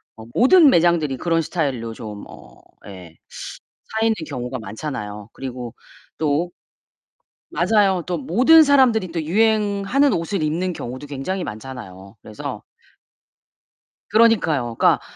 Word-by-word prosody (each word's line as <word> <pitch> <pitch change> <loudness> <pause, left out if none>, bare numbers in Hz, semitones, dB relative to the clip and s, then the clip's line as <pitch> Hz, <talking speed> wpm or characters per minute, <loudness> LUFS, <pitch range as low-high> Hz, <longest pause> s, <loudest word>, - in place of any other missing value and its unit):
어 110 - -11
모든 300 +4 +6
매장들이 165 - +2
그런 165 +1 0
스타일로 135 -9 -3
좀 105 -2 -8
어 - - -15 0.3
예 90 -4 -11 0.9
차 225 - +2
있는 225 -1 +2
경우가 125 -3 -5
많잖아요. 105 -2 -6
그리고 125 -3 -7 0.4
또 155 +3 0 1.0
맞아요. 195 -1 +2
또 180 -1 -2
모든 250 - +5
사람들이 255 - +3
또 165 -2 -2
유행하는 215 - +2
옷을 170 +1 -2
입는 175 +4 -1
경우도 130 0 -7
굉장히 150 +7 -4
많잖아요. 110 -4 -9
그래서 105 -1 -7 1.5
그러니까요. 170 - +3
그러니까 - - +4
160 Hz, 280 characters per minute, -21 LUFS, 120-200 Hz, 1.5 s, 모든